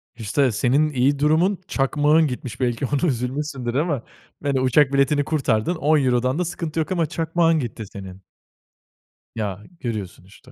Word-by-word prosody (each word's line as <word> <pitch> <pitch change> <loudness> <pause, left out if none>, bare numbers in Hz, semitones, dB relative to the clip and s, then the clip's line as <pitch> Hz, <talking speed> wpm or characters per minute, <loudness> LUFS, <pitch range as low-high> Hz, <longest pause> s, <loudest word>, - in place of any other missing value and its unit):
İşte, 120 +4 +1
senin 135 +8 +2
iyi 140 +1 +1
durumun, 170 +6 +2
çakmağın 150 +3 +2
gitmiş 125 -1 -6
belki 120 0 0
ona 145 +6 0
üzülmüşsündür 125 0 -3
ama, 145 -5 0 0.4
yani, 140 -2 +1
uçak 135 +2 +3
biletini 145 +1 +3
kurtardın 140 0 0
€10'dan 135 -2 +2
da 180 - 0
sıkıntı 165 -2 -4
yok 160 +3 -2
ama 170 -3 +1
çakmağın 165 0 +1
gitti 115 -3 -5
senin. 95 -1 -10 1.1
Ya, 105 -2 -4 0.2
görüyorsun 105 -7 -5
işte. 125 +6 -18
140 Hz, 145 wpm, -22 LUFS, 120-155 Hz, 1.1 s, uçak